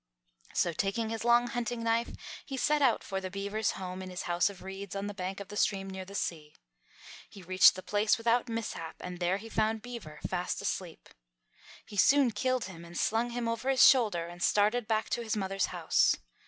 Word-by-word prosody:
So, 170 - +2
taking 220 +6 -1
his 225 0 -3
long 240 0 +5
hunting 240 -1 -3
knife, 230 +1 +1 0.3
he 270 - -6
set 300 +3 +2
out 260 -4 +3
for 195 -1 -3
the 185 - -4
beaver's 200 +3 -2
home 185 0 -6
in 185 - -7
his 180 -1 -5
house 175 +2 +2
of 190 -2 -11
reeds 195 +1 -7
on 195 0 -3
the 205 - -4
bank 190 0 -4
of 200 - -8
the 205 - -8
stream 195 -2 +1
near 190 -1 -6
the 200 +1 -10
sea. 155 -6 -4 0.7
He 195 - -12
reached 185 +2 +6
the 185 - -7
place 210 +1 +2
without 235 +2 +1
mishap 225 -8 -4
and 180 -1 -6
there 180 +2 +1
he 220 +3 -10
found 220 0 0
Beaver 225 -12 -8
fast 180 -1 -2
asleep. 185 -4 -4 0.8
He 205 - -10
soon 270 +4 +5
killed 255 +2 0
him 175 -3 -9
and 170 0 -9
slung 230 +2 +1
him 240 0 -3
over 230 +3 -2
his 265 -2 +7
shoulder 210 -10 +4
and 175 +1 -10
started 215 +5 +2
back 220 -1 0
to 240 - 0
his 220 -2 -2
mother's 195 -1 0
house. - - +2
205 Hz, 210 wpm, -30 LUFS, 185-230 Hz, 0.8 s, his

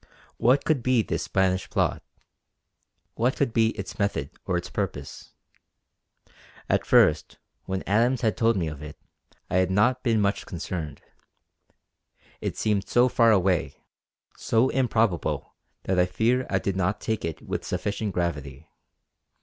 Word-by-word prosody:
What 130 +4 +3
could 155 -5 +2
be 125 -2 +2
this - - -2
Spanish 95 -1 0
plot; - - 0 1.1
what 120 +3 0
could 135 -5 0
be 110 -1 +3
its 100 - -7
method 100 -9 -1 0.2
or 90 - +1
its 90 - -4
purpose? - - -5 1.3
At - - 0
first - - +3 0.3
when 95 0 -3
Adams 115 +5 +2
had 110 -3 +1
told 115 -2 +2
me 85 -3 -1
of 75 -2 -7
it, 75 0 -9 0.5
I - - 0
had 95 -1 +2
not 120 +7 +2
been 115 -3 +2
much 100 0 0
concerned; 85 -3 -5 1.4
it - - -3
seemed 105 -2 0
so 125 +1 +4
far 115 -1 +4
away, 95 -4 +2 0.6
so 115 +3 +2
improbable, 115 -8 0 0.3
that 95 -1 0
I 90 - +4
fear 115 +8 +1
I 95 - +1
did 95 0 -2
not 95 +3 0
take 110 -1 -2
it 80 -2 -5
with - - -4
sufficient 100 0 -2
gravity. 75 -5 -4
100 Hz, 145 wpm, -26 LUFS, 90-115 Hz, 1.4 s, so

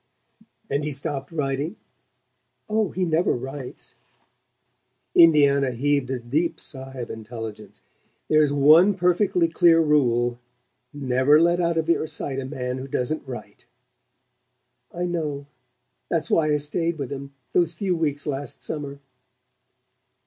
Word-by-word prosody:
"And 140 +2 -1
he 150 - -2
stopped 140 0 -5
writing?" 145 +3 -2 0.9
"Oh, 215 -2 +1
he 185 0 -1
never 165 +1 +2
writes." 130 +1 -7 1.2
Indiana 140 -5 +5
heaved 140 +1 0
a 130 - -1
deep 140 +8 -1
sigh 135 -1 -5
of 120 -2 -5
intelligence. 110 -2 -8 0.4
"There's 155 -2 +3
one 155 +8 +6
perfectly 180 -1 +2
clear 165 0 +4
rule: 120 -6 +2 0.5
never 135 +1 +3
let 170 +1 +3
out 170 -1 +1
of 160 0 0
your 170 -1 +1
sight 145 -3 -4
a 135 - -4
man 130 -2 -4
who 130 - -7
doesn't 135 +3 -2
write." 125 -2 -9 1.2
"I 175 +1 -3
know. 155 -5 -3 0.6
That's 165 -3 -1
why 160 -2 +3
I 150 - +3
stayed 165 +3 -2
with 140 -4 -5
him 140 0 -7 0.2
those 170 -2 +2
few 185 0 -1
weeks 145 -3 -1
last 145 -1 -5
summer...." 140 -2 -5
145 Hz, 130 wpm, -24 LUFS, 135-165 Hz, 1.2 s, one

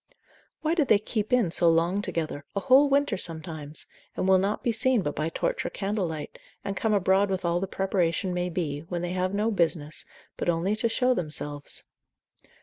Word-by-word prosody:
Why 315 +1 +2
do 335 -3 +3
they 225 -6 +5
keep 215 +2 -3
in 240 -9 +3
so 170 0 +3
long 170 +4 +2
together, 155 -7 -3
a - - +1
whole 275 +5 +5
winter 280 -6 +2
sometimes, 160 -3 -3 0.3
and 185 - 0
will 190 0 +6
not 200 +3 -1
be 240 - +2
seen 240 -1 +2
but 145 - -2
by 155 +2 -1
torch - - -1
or - - -2
candlelight, 190 -7 -3 0.3
and 200 - -2
come 220 +2 0
abroad 195 +1 +3
with 190 -2 -2
all 170 0 +2
the 195 - -2
preparation 185 -1 0
may 180 0 -1
be, 160 -5 -2
when 175 -1 -2
they 175 - -2
have 185 +1 -1
no 215 +3 +1
business, 165 -5 0 0.3
but - - -1
only 175 +5 +1
to 230 +2 0
show 250 +3 +2
themselves? 150 -6 -3
185 Hz, 195 wpm, -27 LUFS, 165-215 Hz, 0.3 s, will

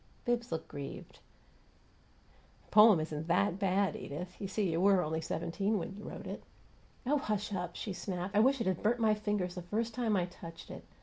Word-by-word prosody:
Bibbs 240 -2 0
looked 160 -1 -3
grieved. 140 -2 -8 1.5
"The - - -28
poem 210 -4 +8
isn't 155 0 -4
THAT 180 +2 +2
bad, 195 0 +2
Edith. 175 +6 -6
You 195 - -2
see, 195 -2 0
you 165 +1 0
were 195 -2 +5
only 160 +1 -2
seventeen 170 +7 -1
when 195 +1 -4
you 210 - -9
wrote - - -7
it." - - -6 0.6
"Oh, 290 +3 +2
hush 210 -3 -2
up!" 180 -2 -3
she 205 - -4
snapped. 185 +1 -4
"I - - +6
wish 265 +4 +4
it 230 - -1
had 185 -2 0
burnt 235 +3 +2
my 220 -2 +4
fingers 205 -4 -1
the 180 - -5
first 225 +6 -2
time 230 -3 +1
I 180 - +2
touched 170 -2 -10
it. - - -9
195 Hz, 200 wpm, -33 LUFS, 175-215 Hz, 1.5 s, poem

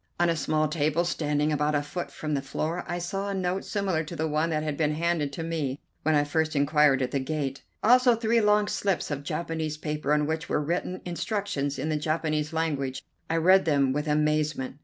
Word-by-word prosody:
On 175 -1 +4
a - - 0
small 155 +1 +1
table, 155 +2 +1
standing 150 -3 0
about 150 0 +1
a 145 - +1
foot 170 +4 -5
from 155 -1 -4
the 140 - 0
floor, 155 +5 -3
I 175 -1 -2
saw 195 +3 -3
a 200 - -2
note 185 0 -1
similar 190 -6 -1
to 170 - -7
the 160 0 -1
one 155 +2 0
that 155 -1 -1
had 150 -2 -2
been 150 0 0
handed 165 -3 0
to 165 - -4
me 155 -5 -2 0.2
when 155 0 +2
I 145 - +4
first 155 +2 0
inquired 145 -1 +4
at 125 - -2
the 140 - 0
gate, 135 0 -3 0.2
also 250 +1 +6
three 230 0 +2
long 210 0 +3
slips 190 -8 -1
of 145 -1 -2
Japanese 160 0 -3
paper 150 -2 -3
on 150 0 +3
which 160 +1 -3
were - - +1
written 175 +4 -2
instructions 175 -6 -2
in 155 +4 -2
the 155 - +1
Japanese 155 0 -1
language. 140 -5 -2 0.3
I 165 - +1
read 185 +4 +5
them 140 -4 +2
with 150 +2 -2
amazement. 150 -3 0
155 Hz, 215 wpm, -27 LUFS, 150-170 Hz, 0.3 s, also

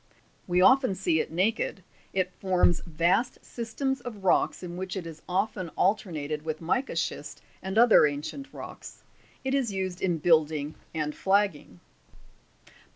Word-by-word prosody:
We 180 0 +2
often 260 -1 +5
see 175 -4 +1
it - - -2
naked; 190 +2 0 0.3
it 185 -1 0
forms 180 -3 +3
vast 175 +9 +1
systems 255 +3 -3
of 220 -5 -8
rocks 185 - +2
in 175 -1 -6
which 185 +1 -4
it 180 - -5
is 160 -2 -9
often 185 -1 -1
alternated 160 -7 0
with 155 -1 -3
mica 245 +11 -1
schist - - -3 0.2
and 190 +2 -4
other 230 -9 +7
ancient 150 - -5
rocks. - - -10 0.4
It 265 0 -1
is 265 -6 +1
used 190 -2 -3
in 175 -3 +1
building 155 -2 +2 0.2
and 150 -2 -2
flagging. 190 - 0
185 Hz, 145 wpm, -28 LUFS, 160-215 Hz, 0.4 s, other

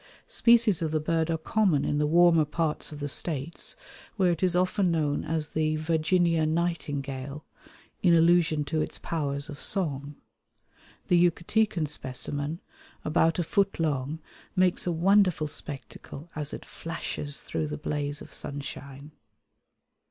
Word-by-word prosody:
Species 235 - +4
of 160 - 0
the 155 0 0
bird 160 +1 0
are 165 - +1
common 170 -3 +1
in 145 - 0
the 150 - +2
warmer 170 0 +5
parts 155 +1 -2
of 150 - -8
the 145 - -3
States, 150 +2 -1 0.4
where 185 -5 +3
it 170 - -2
is 180 -2 +3
often 185 +1 +2
known 150 -3 0
as 155 -1 -2
the 155 0 0
Virginia 165 +1 +2
Nightingale, 145 -4 -2 0.6
in 175 -2 +5
allusion 165 -2 +4
to 155 +2 -1
its - - -4
powers 140 -3 -2
of 145 -3 -9
song. 145 -6 -1 0.9
The 175 -1 +5
Yucatecan 175 -1 0
specimen, 145 +3 -4 0.4
about 165 +1 +2
a 175 - +1
foot 195 +3 0
long, 145 -2 -1 0.4
makes 185 -1 +2
a - - +2
wonderful 180 -1 +3
spectacle 150 +2 -8
as 150 -1 -3
it - - -7
flashes 150 -3 -4
through 80 -2 -2
the 75 0 -4
blaze 145 - -3
of - - -14
sunshine. 140 0 -7
160 Hz, 145 wpm, -27 LUFS, 145-175 Hz, 0.9 s, warmer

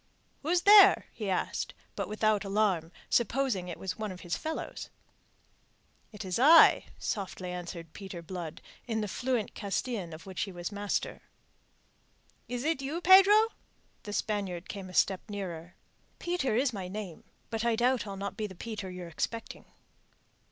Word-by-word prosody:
"Who's 345 +4 +1
there?" 400 0 +8
he 210 -3 -4
asked, 185 - -2 0.2
but - - -3
without 215 -1 +1
alarm, 195 -5 +1 0.2
supposing 235 -5 +1
it 175 - -6 0.2
one 215 -2 -3
of 185 - -9
his 175 -1 -2
fellows. 320 0 -5 1.2
"It 210 -2 -8
is 185 +3 -2
I," 315 +5 +8
softly 190 -3 -4
answered 170 -2 -7
Peter 190 -4 -8
Blood 170 -2 -7 0.2
in 220 -2 -1
the 210 - -2
fluent 245 +1 -2
Castillan 200 -2 -3
of 155 +1 -10
which 190 -2 -5
he 195 - -2
was 175 +1 -5
master. 205 0 -2 1.3
"Is 245 0 -3
it 315 -2 0
you, 285 +5 -3
Pedro?" 390 +5 +7 0.5
The 205 - -7
Spaniard 195 -5 -2
came 195 -2 -7
a - - -11
step 190 -2 +3
nearer. 175 -4 -6 0.4
"Peter 345 -10 -1
is 250 +1 +2
my 190 -3 -5
name; 190 -3 -7 0.3
but 225 0 -2
I 235 -1 +2
doubt 245 0 +1
I'll 195 -1 -6
not 200 +1 -4
be 215 - -3
the 190 - -11
Peter 210 -1 -6
you're 180 -1 -7
expecting." 225 +7 -4
205 Hz, 155 wpm, -30 LUFS, 185-245 Hz, 1.3 s, there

